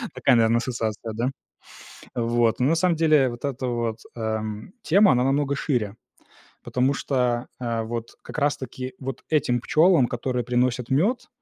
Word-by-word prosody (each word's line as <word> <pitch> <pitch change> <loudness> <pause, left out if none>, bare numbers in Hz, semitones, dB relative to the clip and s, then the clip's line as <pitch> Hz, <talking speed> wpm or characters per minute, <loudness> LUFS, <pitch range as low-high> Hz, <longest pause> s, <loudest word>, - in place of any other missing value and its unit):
Такая, - - +3
наверно, 115 0 +4
ассоциация, 115 -2 -3
да? 120 +4 -1 0.9
Вот, 115 -1 +1
но 125 - +2
на - - +4
самом 170 0 +2
деле 155 -4 +4
вот 120 +1 -8
эта 135 -2 -2
вот, 115 -2 -2 0.2
эм, 110 - -4
тема, 195 0 +5
она 125 0 +2
намного 140 +1 +1
шире, 120 -8 -1 0.7
потому 130 +2 +1
что, 125 -3 0
а, 115 -2 -2
вот 115 0 -5
как - - -9
раз-таки 130 -3 -2
вот 130 -1 -6
этим 125 -6 +2
пчёлам, 160 +1 +4
которые 125 0 -2
приносят 125 0 0
мёд, 205 - +1
125 Hz, 150 wpm, -24 LUFS, 115-140 Hz, 0.9 s, тема